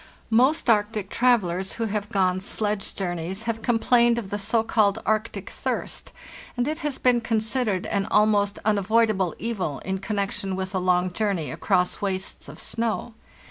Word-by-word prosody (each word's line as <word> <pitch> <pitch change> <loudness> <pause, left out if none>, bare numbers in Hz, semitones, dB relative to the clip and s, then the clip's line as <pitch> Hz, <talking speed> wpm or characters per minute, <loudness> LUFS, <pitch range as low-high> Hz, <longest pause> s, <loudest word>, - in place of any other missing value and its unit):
Most 260 +8 +3
Arctic 210 -2 +1
travellers 190 -7 +2
who 230 - -2
have 210 -1 -3
gone 185 -2 +1
sledge 205 +1 -2
journeys 180 +2 -3
have 225 -1 -2
complained 235 0 +3
of 210 -5 -4
the 205 - -2
so 220 +3 +1
called 215 -2 +2
Arctic 220 +1 -1
thirst, - - -3 0.5
and 245 +2 +1
it 310 +2 -2
has 295 -4 -2
been 245 -2 +3
considered 220 -3 0
an 200 -1 -1
almost 210 -1 +3
unavoidable 210 -2 +2
evil 195 -11 -3
in 190 0 -2
connection 195 -1 -2
with 190 0 -4
a 190 - +1
long 180 0 +1
journey 195 -8 -1
across 180 0 0
wastes 190 -1 -3
of - - -11
snow. 230 0 -2
210 Hz, 155 wpm, -25 LUFS, 190-230 Hz, 0.5 s, Most